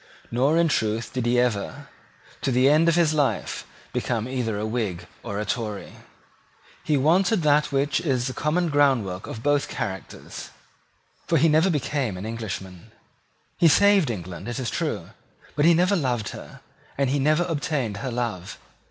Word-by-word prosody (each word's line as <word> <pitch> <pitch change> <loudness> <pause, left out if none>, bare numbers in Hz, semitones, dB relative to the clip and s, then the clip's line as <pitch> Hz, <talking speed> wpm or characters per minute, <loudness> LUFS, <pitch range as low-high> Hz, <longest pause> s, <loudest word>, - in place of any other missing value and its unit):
Nor 135 +7 +2
in 170 0 +4
truth 110 -5 -1
did 125 -2 -1
he 120 +1 +3
ever, 115 -5 -1 0.5
to 135 - 0
the 125 +2 +4
end 155 +4 +5
of 165 - +2
his 165 -3 +3
life, 145 -3 -1 0.3
become 115 -1 -1
either 125 -5 -2
a 105 - -2
Whig 110 -6 -2 0.2
or 100 - -5
a 105 - -2
Tory. 105 -4 -4 0.9
He 150 - +1
wanted 175 +7 +3
that 150 0 +3
which 140 +2 +1
is 130 -7 0
the 130 - -3
common 165 +6 0
groundwork 130 -11 +1
of 115 - -7
both 145 -1 +2
characters; 95 -7 -6 0.8
for - - +3
he 165 - +4
never 160 +4 +4
became 140 - -1
an 95 - -6
Englishman. 95 -5 -6 0.7
He 170 - +6
saved 195 -1 +5
England, 90 -3 -6
it 120 - -4
is 125 -5 -2
true; - - -3 0.4
but 145 - +2
he 170 0 +6
never 180 +4 +3
loved 125 - -1
her, - - -10 0.4
and 135 -2 +1
he 145 - +1
never 155 +5 +3
obtained 145 - -2
her 130 - -4
love. 115 -7 -4
130 Hz, 170 wpm, -24 LUFS, 110-155 Hz, 0.9 s, He